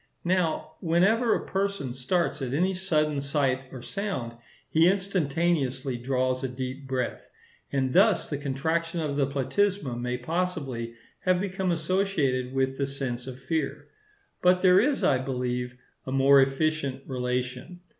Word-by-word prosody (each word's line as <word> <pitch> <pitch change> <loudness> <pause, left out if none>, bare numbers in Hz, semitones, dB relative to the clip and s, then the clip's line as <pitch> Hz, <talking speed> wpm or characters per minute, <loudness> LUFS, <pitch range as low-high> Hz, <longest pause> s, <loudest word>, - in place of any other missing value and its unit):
Now, 165 -3 0
whenever 200 +8 +3
a - - -4
person 195 -10 -2
starts 145 +6 -1
at 130 0 -2
any 185 +5 +2
sudden 155 -6 0
sight 135 -2 0
or 130 -2 -8
sound, 195 - -3 0.3
he 165 +2 +4
instantaneously 160 -8 0
draws 130 +1 0
a - - +1
deep 130 +2 -6
breath; 130 -2 -3 0.4
and 130 -2 0
thus 200 +1 +4
the 145 - -3
contraction 160 +5 -1
of 150 -3 -2
the 140 -2 +2
platysma 140 +2 0
may 125 0 -1
possibly 135 -6 -3 0.3
have 185 -1 +3
become 190 -1 -1
associated 160 -7 0
with 135 0 0
the 140 - +1
sense 130 -3 -4
of 130 -1 -7
fear. 145 0 -2 0.5
But 180 0 +4
there 185 0 +7
is, 275 +6 +1
I 130 -3 +4
believe, 125 -1 -3 0.3
a - - -3
more 135 +1 +6
efficient 135 0 0
relation. 125 +6 -3
140 Hz, 145 wpm, -27 LUFS, 130-180 Hz, 0.5 s, there